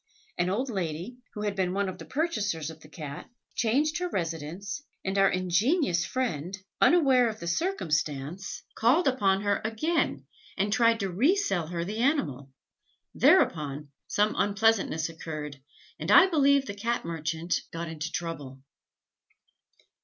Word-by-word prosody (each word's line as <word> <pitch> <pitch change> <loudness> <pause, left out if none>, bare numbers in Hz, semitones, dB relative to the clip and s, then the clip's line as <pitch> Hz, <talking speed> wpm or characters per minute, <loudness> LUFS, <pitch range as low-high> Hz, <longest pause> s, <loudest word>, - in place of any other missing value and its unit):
An 175 - 0
old 245 +7 -1
lady, 180 +4 -4 0.2
who 210 - -4
had 205 -1 -1
been 185 -2 0
one 200 0 +1
of 185 0 -6
the - - -8
purchasers 210 - -1
of 160 - -13
the 155 - -15
Cat, 150 -3 -8 0.2
changed 295 +9 +1
her 360 0 -2
residence, 170 - -4 0.2
and 190 +1 -1
our 195 -1 +5
ingenious 185 - +1
friend, 190 - -2 0.2
unaware 265 -8 +5
of 220 0 -7
the - - -7
circumstance, 170 - -2
called 270 +9 +3
upon 200 -7 +2
her 205 -1 +1
again, 225 +11 -1 0.3
and 205 +1 +1
tried 230 -1 +3
to 195 -1 -1
re 265 - +3
sell 195 - 0
her 170 0 -3
the 210 +4 -4
animal; 165 - 0 0.6
thereupon, 150 -2 +3 0.2
some 210 +1 +2
unpleasantness 200 -5 +2
occurred, 155 -4 -7 0.4
and 155 - -4
I 355 - +9
believe 280 -6 +3
the 205 - -5
Cat 230 +2 -2
merchant 165 +1 -2
got 165 +1 -4
into 160 0 -5
trouble. 145 -6 -5
195 Hz, 145 wpm, -28 LUFS, 165-240 Hz, 0.6 s, I